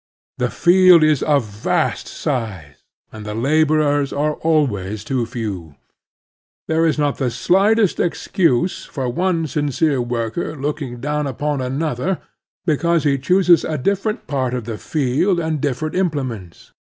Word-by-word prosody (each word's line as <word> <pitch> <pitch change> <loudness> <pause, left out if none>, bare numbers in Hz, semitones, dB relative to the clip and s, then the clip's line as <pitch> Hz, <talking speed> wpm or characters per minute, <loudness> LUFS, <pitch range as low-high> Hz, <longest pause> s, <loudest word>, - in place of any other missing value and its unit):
The - - +1
field 180 -2 +5
is 155 -3 +3
of 145 -5 +2
vast 105 0 -1
size, 95 - -4 0.3
and 110 -1 -9
the 105 0 -5
laborers 145 +2 +2
are 150 +2 0
always 110 - 0
too 125 -1 -1
few. 100 -10 -5 0.9
There 160 +1 +2
is 155 - 0
not 145 -2 0
the 130 -3 +1
slightest 195 - +2
excuse 175 - 0
for 135 -3 -4
one 170 +5 0
sincere 145 -1 0
worker 120 +6 -3
looking 140 -4 -4
down 150 +1 -1
upon 145 +1 -2
another 140 +6 -2 0.5
because 170 +1 +1
he 140 -2 +1
chooses 180 +4 +4
a 155 - -2
different 200 - -1
part 130 -3 -1
of 125 - -3
the 110 -1 -6
field 155 +6 0
and 160 -3 -2
different 145 +2 -2
implements. 130 - -3
145 Hz, 140 wpm, -19 LUFS, 125-160 Hz, 0.9 s, field